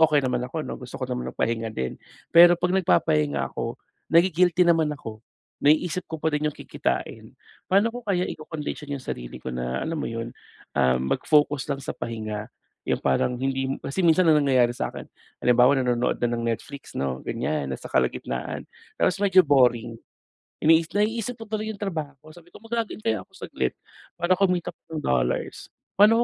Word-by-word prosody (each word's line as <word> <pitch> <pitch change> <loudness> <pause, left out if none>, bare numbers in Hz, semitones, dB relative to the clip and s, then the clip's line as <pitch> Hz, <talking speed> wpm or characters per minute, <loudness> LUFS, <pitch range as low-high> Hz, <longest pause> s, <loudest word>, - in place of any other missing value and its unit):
okey 150 -3 +4
naman 125 -1 0
ako 155 +2 -4
'no, - - -5
gusto 125 - -8
ko 130 - -2
naman 125 -1 -3
ng - - -21
pahinga 115 0 0
din. 65 -11 -3 0.4
Pero 175 +1 +8
'pag 180 0 0
nagpapahinga 75 - +2
ako - - -4 0.4
nagi-guilty 175 +1 +4
naman 160 -3 +3
ako. 115 -5 -9 0.4
Naiisip 165 +4 +3
ko 160 - -4
pa 160 - +1
din 150 +1 +1
'yong - - -4
kikitain, - - -3 0.4
paano 200 +4 +4
ko 245 - -6
kaya 185 -4 0
ikokondisyon 150 -1 -6
'yong 130 - -14
sarili - - -6
ko - - -7
na 60 +1 -2
alam 165 - -2
mo - - -3
'yon, 115 0 -5 0.4
ah, 65 0 +3
mag-focus 145 - +1
lang 140 - -1
sa - - -5
pahinga. 110 -2 -5 0.3
Yung - - 0
parang 70 - +1
hindi, 135 0 -1
kasi 140 +7 -3
minsan 170 +1 +4
ang 150 -2 +5
nangyayari 125 -3 +3
sa - - -2
akin - - -9 0.3
halimbawa 125 +3 +4
nanonood 125 -1 +1
na 120 - +1
ng 115 - -3
Netflix 140 +5 -6
'no 65 -1 -2
gan'yan 70 - -2
na 65 - -4
sa - - -9
kalagitnaan 65 0 -2 0.3
tapos 185 +2 +1
medyo 190 -4 +5
boring. 120 -4 +3 0.7
Ini 160 +1 +5
naiisip 225 +3 -1
ko 225 - -7
tuloy 215 0 -3
yung 200 - -10
trabaho 155 -6 -5
sabi 175 0 -17
ko - - -13
mag-log 225 0 -3
in - - -7
kaya 110 - -1
ako - - -35 0.2
saglit 65 -1 -1 0.5
para 175 +2 +3
kumita 180 -3 0
pa - - -69
ng 155 - -3
dollars. 60 -1 -1 0.2
Pa'no 215 +3 +6
145 Hz, 185 wpm, -25 LUFS, 115-175 Hz, 0.7 s, Pero